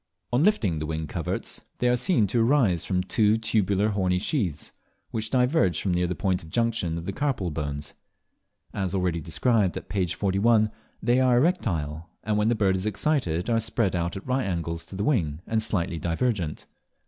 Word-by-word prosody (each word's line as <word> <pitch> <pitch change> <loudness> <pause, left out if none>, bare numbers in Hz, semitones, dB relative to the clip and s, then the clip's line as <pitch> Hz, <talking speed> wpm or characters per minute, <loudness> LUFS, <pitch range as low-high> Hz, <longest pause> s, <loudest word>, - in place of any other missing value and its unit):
On 125 +5 +3
lifting 110 - +2
the 75 - -3
wing 80 0 -3
coverts - - -4 0.2
they 125 - +1
are 125 - +4
seen 125 - +2
to 110 +5 0
arise 115 - +3
from 90 -2 0
two 105 +3 +3
tubular 105 -2 +1
horny 95 -3 +1
sheaths, 90 - -2 0.4
which 110 -1 -2
diverge 125 - +2
from 95 - 0
near 90 0 +1
the 90 - -2
point 95 -2 0
of 80 - -12
junction 115 -6 0
of 85 - -6
the 100 - -3
carpal 125 - -1
bones. 70 -1 -4 0.8
As 95 -2 -2
already 90 -3 0
described 100 - +1
at - - -8
p. 95 -3 0
41, 105 +4 +2 0.3
they 120 +1 +3
are 130 -2 +4
erectile, 85 - 0
and 105 0 0
when 105 +1 +2
the 120 - +2
bird 95 -3 +2
is 95 +3 -1
excited 100 - 0
are 115 -1 +2
spread 115 -3 0
out 85 +1 -2
at 95 - -9
right 130 -3 0
angles 85 -2 -3
to - - -8
the 100 - -2
wing 85 - +1
and 110 -1 0
slightly 85 -6 -1
divergent. 85 0 -1
100 Hz, 190 wpm, -26 LUFS, 85-115 Hz, 0.8 s, are